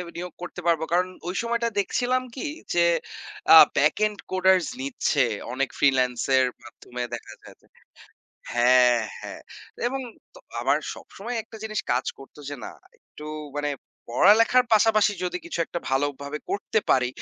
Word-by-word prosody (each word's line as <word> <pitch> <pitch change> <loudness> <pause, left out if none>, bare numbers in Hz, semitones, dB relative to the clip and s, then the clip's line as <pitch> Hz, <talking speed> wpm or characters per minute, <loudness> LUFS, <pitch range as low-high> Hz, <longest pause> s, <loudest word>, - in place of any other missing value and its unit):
নিয়োগ 180 0 -6
করতে 180 0 -7
পারব। 165 -2 +3
কারণ 180 +1 +3 0.2
ওই 185 - -3
সময়টা 235 0 -1
দেখছিলাম 250 +5 0
কি 265 - -4 0.3
যে 175 - +2 0.7
আ - - +11 0.2
ব্যাক - - +3
এন্ড 210 -1 -2
কোডার্স 185 -1 +3 0.2
নিচ্ছে 245 - +1 0.3
অনেক 135 0 -1
ফ্রিল্যান্স 130 -3 +2 0.2
এর 130 - +4 0.2
মাধ্যমে 125 +1 -9
দেখা 115 - -7
যায় - - -14
যে - - -27 0.9
হ্যাঁ, 125 0 +5 0.2
হ্যাঁ। - - -8 0.5
এবং 270 +2 -2 0.3
ত - - -17 0.2
আমার - - +2 0.2
সবসময় 235 +5 -8
একটা 220 0 -13
জিনিস 215 -1 -2
কাজ 125 +1 0
করতো 135 +2 -15
যে 145 - -4
না - - -6 0.3
একটু 150 - -14 0.3
মানে 145 0 -1 0.4
পড়ালেখার 225 - +5
পাশাপাশি 215 -1 +4
যদি 180 0 -2
কিছু 170 - -5
একটা - - -4
ভালো 135 +2 +2 0.2
ভাবে 145 +2 -5
করতে 205 +2 0
পারি। 125 -1 +3
180 Hz, 155 wpm, -25 LUFS, 135-220 Hz, 0.9 s, আ